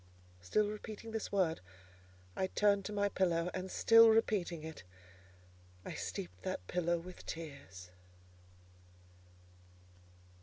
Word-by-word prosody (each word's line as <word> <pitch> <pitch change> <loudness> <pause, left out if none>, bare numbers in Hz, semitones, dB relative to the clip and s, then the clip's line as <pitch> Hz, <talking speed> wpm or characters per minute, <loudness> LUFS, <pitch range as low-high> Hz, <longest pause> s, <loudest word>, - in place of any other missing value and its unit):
Still 205 - +1
repeating 215 +1 -7
this 220 -1 -4
word, 185 -5 +1 0.8
I 190 - 0
turned 200 0 +2
to - - -4
my 205 -1 +1
pillow; 175 -3 +1
and 185 0 -4
still 230 +3 +7
repeating 200 -7 +1
it, 160 0 -8 1.0
I - - -5
steeped 90 +1 -6
that 90 - -4
pillow 175 - 0
with 180 +2 -10
tears. 140 - -8
185 Hz, 110 wpm, -35 LUFS, 160-210 Hz, 1.0 s, still